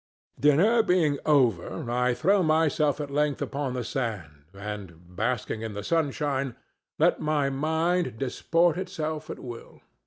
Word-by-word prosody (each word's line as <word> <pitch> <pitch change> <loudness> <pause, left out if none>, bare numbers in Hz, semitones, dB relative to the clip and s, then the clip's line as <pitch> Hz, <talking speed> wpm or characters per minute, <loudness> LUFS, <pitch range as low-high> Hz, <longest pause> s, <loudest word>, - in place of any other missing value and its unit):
Dinner 170 - +5
being 165 -8 +2
over, 125 - +2
I 125 0 +1
throw 190 +10 +3
myself 155 -3 +2
at 145 -2 -4
length 145 0 +1
upon 140 -2 -3
the 125 - -2
sand 90 - -4
and, 95 -4 -8
basking 115 +1 -2
in 110 -2 -5
the 105 - -5
sunshine, 140 -4 -1 0.4
let - - +3
my 150 -2 +1
mind 160 0 0
disport 165 +6 +1
itself 155 -5 -4
at - - -5
will. 120 -2 -10
140 Hz, 135 wpm, -27 LUFS, 115-155 Hz, 0.4 s, Dinner